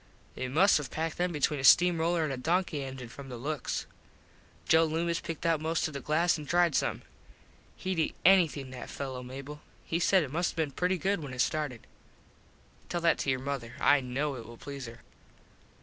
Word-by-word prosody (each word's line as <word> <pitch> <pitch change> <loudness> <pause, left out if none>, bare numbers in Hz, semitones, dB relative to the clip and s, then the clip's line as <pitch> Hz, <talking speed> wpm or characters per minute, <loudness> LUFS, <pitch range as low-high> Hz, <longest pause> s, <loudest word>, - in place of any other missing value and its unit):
They 130 - -4
must 160 +8 +4
have 140 -4 -5
packed 160 +3 -3
them 180 0 +1
between 150 -1 0
a - - -4
steam 175 +5 +6
roller 165 0 +1
and 150 -3 -1
a - - -2
donkey 165 +3 0
engin 130 -2 -6
from 135 +3 -10
the 125 - -6
looks. 140 +2 -3 0.8
Joe 160 0 +6
Loomis 165 +1 -1
picked 165 0 -6
out 165 -2 +2
most 160 +1 0
of 155 - -9
the 140 - -4
glass 160 +4 +1
an 150 - -8
tried 175 0 +3
some. - - 0 0.7
Hed 185 -2 -2
eat 160 - 0
anything, 165 -8 +4
that 125 -1 -8
fello, 130 -2 -5
Mable. 135 +4 -8 0.2
He 165 - -1
said 185 0 +4
it 135 - -6
must 175 +2 0
have - - -23
been 155 -3 0
pretty 180 +6 0
good 195 +4 0
when 140 -4 -7
it - - -10
started. 145 -7 -2 1.0
Tell 175 - -2
that 170 -1 +3
to - - -1
your 130 - +2
mother. 130 -4 -4
I 145 0 +5
know 135 +3 -2
it 120 -4 -8
will 120 0 -11
please 140 -1 -7
her. 115 +1 -11
150 Hz, 210 wpm, -30 LUFS, 135-170 Hz, 1.0 s, steam